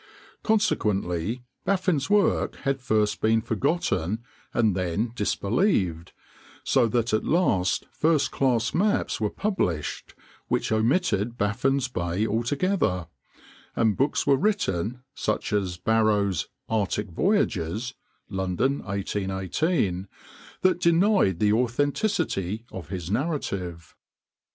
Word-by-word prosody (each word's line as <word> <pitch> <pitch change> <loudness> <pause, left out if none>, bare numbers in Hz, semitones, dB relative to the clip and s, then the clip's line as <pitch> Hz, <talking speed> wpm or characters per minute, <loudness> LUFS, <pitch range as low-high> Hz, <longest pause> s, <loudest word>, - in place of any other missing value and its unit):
Consequently 105 - 0 0.2
Baffin's 185 -7 +1
work 205 -1 +2
had 135 -1 -2
first 105 -3 +1
been 110 +1 +3
forgotten 110 - -1 0.3
and 110 -6 +2
then 95 +5 -1
disbelieved; 100 - 0 0.5
so 115 - +3
that 115 0 0
at 110 - +2
last 95 - +1
first 150 -4 +2
class 125 -4 +1
maps 205 - +1
were 105 - +1
published 100 - -2 0.3
which - - 0
omitted 115 - +1
Baffin's 130 +6 +1
Bay 90 -3 -1
altogether, 120 - 0 0.7
and 110 -3 +2
books 140 +3 +1
were 140 -1 +4
written, 125 - -1
such 110 -4 -2
as 95 -4 0
Barrows' 105 -3 +1 0.2
"Arctic 105 -2 -1
Voyages" 120 - 0 0.3
(London, 95 +8 0
1818), 95 - -1 0.5
that 185 -1 +2
denied 170 - +3
the 105 +2 +3
authenticity 120 - 0
of 95 - -8
his 90 -2 -5
narrative. 100 - -3
110 Hz, 105 wpm, -26 LUFS, 95-145 Hz, 0.7 s, were